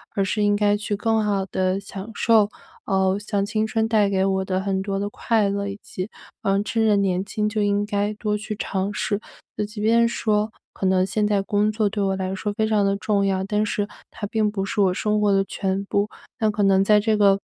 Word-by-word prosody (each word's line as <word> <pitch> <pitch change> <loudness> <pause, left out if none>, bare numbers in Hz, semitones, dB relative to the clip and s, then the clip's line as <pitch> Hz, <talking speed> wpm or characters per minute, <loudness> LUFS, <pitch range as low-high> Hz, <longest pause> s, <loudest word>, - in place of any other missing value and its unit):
而 195 - +2
是 195 +2 -1
应 205 0 +3
该 205 0 +2
去 205 0 -2
更 225 +2 +1
好 200 -2 0
地 185 0 0
享 200 +1 -7
受， 220 -3 +4 0.4
呃， 190 -1 +2
像 205 -1 -1
青 215 +1 -1
春 220 0 0
带 210 -3 +3
给 190 -1 +1
我 190 -1 0
的 185 0 -1
很 190 -1 -1
多 195 0 -2
的 205 +1 -2
快 215 -2 +1
乐， 200 0 -2
以 200 0 -5
及， 185 +3 -5 0.3
呃， 195 +1 +2
趁 225 +1 0
着 210 - +4
年 190 -1 +1
轻 210 +1 -1
就 215 -1 -1
应 205 0 +1
该 205 0 -1
多 210 0 -2
去 215 0 -5
尝 195 0 -2
试。 205 -1 -1 0.4
那 210 - 0
即 210 +1 -9
便 230 +2 +4
说 215 -2 0 0.2
可 190 - -4
能 185 0 +3
现 210 +2 0
在 205 -1 +2
工 205 +2 +1
作 215 -1 +1
对 205 0 -1
我 195 0 +1
来 190 0 -2
说 210 +2 -3
非 220 +1 0
常 215 -2 +2
地 195 0 +1
重 200 -1 +1
要， 190 -1 +1
但 210 +1 0
是 205 -1 -1 0.2
它 205 - -5
并 215 -1 0
不 195 -2 -2
是 205 +1 -1
我 185 -2 +3
生 210 +2 0
活 205 -1 +3
的 195 0 +3
全 195 +1 -2
部。 200 +1 0 0.3
那 220 -2 +2
可 205 0 -2
能 195 0 +4
在 210 +1 +5
这 220 +1 +1
个， 200 -2 +4
205 Hz, 255 characters per minute, -23 LUFS, 195-215 Hz, 0.4 s, 在